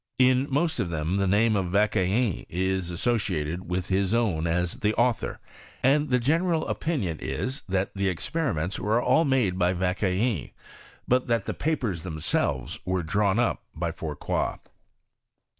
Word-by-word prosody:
In 130 +1 +4
most 155 +4 0
of 90 - 0
them, 80 +3 -1
the 100 -1 +1
name 110 +3 +3
of 95 -3 0
Vauquelin 100 +2 +1
is 95 0 -1
associated 90 -4 -1
with 90 +1 -2
his 95 +2 +1
own 95 -9 +1
as 90 +6 0
the 105 -3 +1
author; 120 -1 0 0.4
and 145 +3 +3
the 125 - +4
general 160 +6 +1
opinion 105 - -2
is, 130 +3 -3
that 95 +1 0
the 100 -1 0
experiments 90 - -2
were 110 +4 +2
all 160 +6 +3
made 120 -10 +1
by 90 +1 +3
Vauque 90 0 -1
lin; 95 - 0 0.6
but 125 +1 +2
that 115 -4 +1
the - - -2
papers 125 - -1
themselves 80 -1 -2
were 95 -1 -1
drawn 100 +4 +1
up 120 0 +1
by 85 +1 -2
Fourcroj. 75 -3 -2
100 Hz, 155 wpm, -26 LUFS, 90-125 Hz, 0.6 s, In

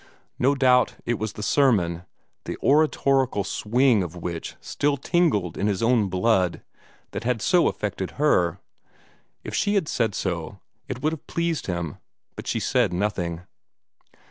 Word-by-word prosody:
No 135 +3 +3
doubt 125 -2 +3
it 120 -2 -1
was 110 -1 -3
the 105 - -7
sermon, 95 - +2 0.4
the - - -4
oratorical 135 -6 +3
swing 115 +3 +2
of 90 -1 -5
which 85 -1 -5
still 145 0 -1
tingled 135 - +1
in 100 - +1
his 100 0 -1
own 115 -4 +3
blood, 95 -1 +1 0.5
that - - -5
had 120 -1 0
so 175 - +3
affected 95 -2 -3
her. 90 - +2 0.9
If - - -7
she 205 0 +1
had 190 -6 +1
said 115 -8 0
so, 90 +1 -3 0.3
it 130 0 -6
would 155 +1 +1
have 160 - -9
pleased 170 -2 -2
him, 85 -4 -3 0.4
but - - -8
she - - 0
said - - +1
nothing. 90 -3 -2
110 Hz, 150 wpm, -24 LUFS, 90-140 Hz, 0.9 s, No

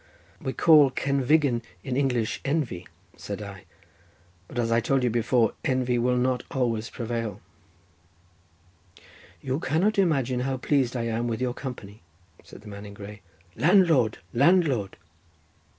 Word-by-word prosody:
"We 130 - -3
call 155 -4 +6
cenfigen 140 -1 +1 0.2
in 130 - -3
English 125 -5 0
envy," 135 - -2 0.3
said - - -6
I; - - -9 0.8
"but - - -10
as 115 -1 0
I 115 - +4
told 130 +3 +1
you 125 - +2
before, 120 0 +2
envy 130 -3 +1
will 125 +1 +1
not 125 0 +1
always 115 -4 -1
prevail." 115 -4 -4 2.0
"You 130 +2 -2
cannot 185 +9 +1
imagine 135 -9 +1
how 130 +1 -1
pleased 130 -1 0
I 120 - -2
am 115 +1 -1
with 115 -2 -2
your 125 -1 -1
company," 110 -6 -8 0.4
said - - -14
the 105 - -14
man 100 0 -9
in 100 - -11
grey. 105 +1 -10 0.3
"Landlord, 155 - +4 0.2
landlord!" 140 - +2
125 Hz, 135 wpm, -26 LUFS, 115-140 Hz, 2.0 s, call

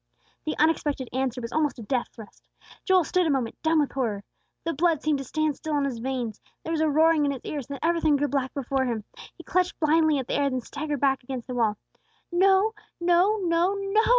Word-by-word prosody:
The 310 - -2
unexpected 295 -4 +1
answer 255 -1 -1
was 230 0 -6
almost 300 -3 0
a 235 - -8
death 245 +3 -1
thrust. 220 -3 -13 0.4
Joel 375 -2 +4
stood 360 +3 +1
a - - +1
moment, 260 -5 -1
dumb 320 0 +3
with 290 - -1
horror. 220 -7 -2 0.4
The 330 - -1
blood 320 0 +1
seemed 305 -2 +1
to - - -4
stand 310 +2 -1
still 310 -2 -2
in 285 - +1
his 255 -4 -3
veins; 245 -3 -3 0.2
there 325 - -4
was 320 -1 0
a 315 - +3
roaring 315 +1 +4
in 285 - +2
his 265 -3 -5
ears; 285 -5 -4
then 280 0 -5
everything 325 -2 +3
grew 290 +1 +1
black 270 -2 -1
before 270 -1 0
him. 230 -4 -2 0.3
He - - -12
clutched 365 0 0
blindly 315 -1 +3
at 265 - -2
the - - -2
air, 280 0 +2
then 255 -1 -2
staggered 290 +2 -4
back 270 -1 +2
against 250 -1 -6
the 255 - -6
wall. 225 -4 +1 0.5
"No, 385 +4 +4 0.3
no, 355 +5 +3
no, 345 +3 +2
NO!" 395 +2 +1
290 Hz, 225 wpm, -26 LUFS, 260-330 Hz, 0.5 s, Joel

